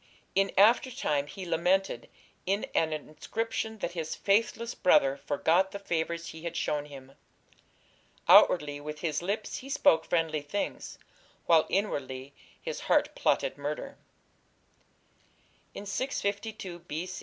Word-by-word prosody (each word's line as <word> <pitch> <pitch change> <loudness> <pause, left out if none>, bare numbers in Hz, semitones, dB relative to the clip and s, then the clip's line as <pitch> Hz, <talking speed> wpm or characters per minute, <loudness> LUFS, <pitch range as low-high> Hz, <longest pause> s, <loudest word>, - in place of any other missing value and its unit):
In 195 0 +2
after 225 +6 +6
time 145 - -1
he 190 +3 -8
lamented 180 +3 0 0.4
in 200 +2 +1
an 160 -1 +2
inscription 220 +9 -4
that - - -2
his 165 -3 -4
"faithless 230 +3 +1
brother" 135 -6 +4
forgot 165 +7 +1
the 200 - -6
favours 170 -3 -2
he 160 - -9
had 170 0 -4
shown 150 -2 -1
him. 135 -2 -11 1.2
"Outwardly 145 -4 +6
with 150 +1 -7
his 155 -2 -1
lips 200 +4 -3
he 270 - -9
spoke 160 -11 +4
friendly 165 -3 0
things, 145 +8 -4 0.5
while 165 -2 +5
inwardly 140 -9 -2 0.3
his - - -5
heart - - +3
plotted - - 0
murder." 150 - -5 1.8
In 200 - -7
652 200 -5 -3
B. 170 +1 -5
170 Hz, 125 wpm, -29 LUFS, 150-200 Hz, 1.8 s, after